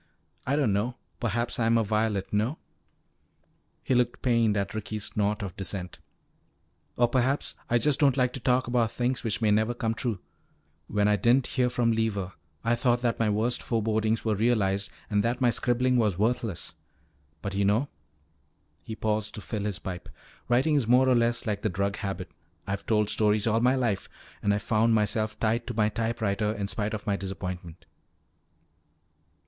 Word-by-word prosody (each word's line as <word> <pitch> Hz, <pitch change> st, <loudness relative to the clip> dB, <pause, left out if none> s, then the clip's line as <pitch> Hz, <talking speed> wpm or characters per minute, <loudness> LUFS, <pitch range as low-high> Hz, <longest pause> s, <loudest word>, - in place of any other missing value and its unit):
"I 140 Hz, -, +2 dB
don't 135 Hz, -9 st, +2 dB
know. 115 Hz, +5 st, -1 dB, 0.2 s
Perhaps 120 Hz, +2 st, -1 dB
I 115 Hz, -, +2 dB
am 115 Hz, 0 st, +4 dB
a 115 Hz, -, +3 dB
violet 105 Hz, -2 st, -1 dB
no?" 110 Hz, +9 st, +1 dB, 1.3 s
He -, -, 0 dB
looked 125 Hz, -1 st, +1 dB
pained 115 Hz, -4 st, +3 dB
at 100 Hz, 0 st, -2 dB
Ricky's 110 Hz, -1 st, -4 dB
snort 105 Hz, +1 st, -1 dB
of 95 Hz, -3 st, -6 dB
dissent. 95 Hz, -2 st, -5 dB, 1.0 s
"Or 120 Hz, -, +4 dB
perhaps 130 Hz, +3 st, 0 dB, 0.2 s
I 120 Hz, -, +4 dB
just 145 Hz, +3 st, +1 dB
don't 140 Hz, -3 st, +4 dB
like 125 Hz, -1 st, +2 dB
to -, -, -4 dB
talk 125 Hz, +1 st, +2 dB
about 120 Hz, -2 st, +1 dB
things 125 Hz, +2 st, -1 dB
which 115 Hz, 0 st, -1 dB
may 105 Hz, -, +4 dB
never 110 Hz, +3 st, +2 dB
come 115 Hz, -1 st, -1 dB
true. 115 Hz, -2 st, -2 dB, 0.7 s
When 105 Hz, 0 st, +1 dB
I 105 Hz, 0 st, +3 dB
didn't 120 Hz, +3 st, +3 dB
hear 125 Hz, -2 st, +1 dB
from 120 Hz, -1 st, +1 dB
Lever, 105 Hz, -4 st, -1 dB, 0.3 s
I 115 Hz, -, +2 dB
thought 120 Hz, 0 st, +1 dB
that 120 Hz, -1 st, 0 dB
my 115 Hz, -2 st, +2 dB
worst 110 Hz, +4 st, 0 dB
forebodings 110 Hz, -1 st, 0 dB
were 110 Hz, -, +2 dB
realized 100 Hz, -3 st, +1 dB, 0.2 s
and 105 Hz, -1 st, +1 dB
that 120 Hz, +1 st, 0 dB
my 125 Hz, -2 st, +4 dB
scribbling 125 Hz, +1 st, +1 dB
was 105 Hz, -6 st, +2 dB
worthless. 115 Hz, -2 st, -1 dB, 0.7 s
But 100 Hz, -, -3 dB
you 100 Hz, +1 st, +1 dB
know," 110 Hz, +8 st, +2 dB, 0.9 s
he 110 Hz, -, -7 dB
paused 105 Hz, -1 st, -1 dB
to 105 Hz, -, -6 dB
fill 105 Hz, 0 st, -4 dB
his 100 Hz, -4 st, -1 dB
pipe, 90 Hz, -2 st, -7 dB, 0.4 s
"writing 130 Hz, +6 st, +3 dB
is 140 Hz, -6 st, +2 dB
more 125 Hz, +2 st, +5 dB
or 130 Hz, -, +5 dB
less 120 Hz, 0 st, +1 dB
like 105 Hz, -2 st, -2 dB
the 110 Hz, -, 0 dB
drug 100 Hz, +2 st, -1 dB
habit. 95 Hz, -4 st, -5 dB, 0.3 s
I've 100 Hz, 0 st, -4 dB
told 105 Hz, -2 st, +2 dB
stories 105 Hz, -1 st, +2 dB
all 110 Hz, 0 st, +2 dB
my 125 Hz, +3 st, +3 dB
life, 115 Hz, -7 st, -1 dB, 0.3 s
and 105 Hz, -, +2 dB
I 100 Hz, -, +2 dB
found 110 Hz, +2 st, +2 dB
myself 110 Hz, 0 st, 0 dB
tied 115 Hz, +2 st, 0 dB
to 120 Hz, -, -4 dB
my 105 Hz, -1 st, +3 dB
typewriter 110 Hz, -2 st, -1 dB
in 100 Hz, -2 st, -3 dB
spite 105 Hz, +1 st, -2 dB
of 105 Hz, -, -7 dB
my 100 Hz, -3 st, 0 dB
disappointment. 90 Hz, -3 st, -6 dB
110 Hz, 180 wpm, -27 LUFS, 105-120 Hz, 1.3 s, more